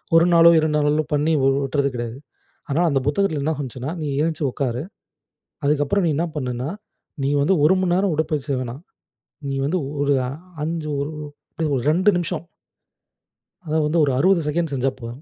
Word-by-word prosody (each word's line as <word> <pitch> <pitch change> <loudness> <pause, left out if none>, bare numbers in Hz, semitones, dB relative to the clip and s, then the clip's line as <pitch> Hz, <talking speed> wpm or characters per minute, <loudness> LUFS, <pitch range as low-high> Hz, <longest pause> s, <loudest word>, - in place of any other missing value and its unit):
1 165 +1 +6
நாளோ, 170 0 +8
2 155 -1 +1
நாளோல 150 +1 +2
பண்ணி 150 +2 +2
வு 135 - +3 0.2
உட்றது 140 +1 0
கிடையாது. 120 +1 -4 0.5
ஆனா 155 +5 +1
அந்த 140 -3 +2
புத்தகத்துல 155 -1 +1
என்ன 160 +2 +1
வந்துச்சுன்னா, 130 +2 -5
நீ 150 - -2
எழுந்ச்சு 160 -1 -1
உட்காரு. 125 -1 -2 0.8
அதுக்கப்புறம் 150 +6 +2
நீ - - +2
என்ன 170 - 0
பண்ணுன்னா, 125 +1 -3 0.5
நீ - - +1
வந்து 190 +6 +3
1 175 +5 +6
மணி 180 -2 +1
நேரம் 190 -1 +2
உடற்பயிற்சி 155 -2 -2
செய்ய 130 -2 0
வேணாம். 125 +6 -7 0.7
நீ 135 - -2
வந்து 175 +5 0 0.2
ஒரு 145 0 +2
அ - - -3 0.3
5 160 0 -3
ஒரு 145 +3 -3 0.4
அப்படியே 160 -2 -2
ஒரு 125 - -1
2 185 +5 +3
நிமிஷம். 170 -1 -3 1.2
அதாவது 155 -2 0
வந்து, 165 +2 +1
ஒரு 135 - +1
60 185 +1 +4
செகண்ட்ஸ் 160 -1 -1
செஞ்சா 130 +1 +1
போதும்.. 120 +4 -8
150 Hz, 180 wpm, -22 LUFS, 140-165 Hz, 1.2 s, நாளோ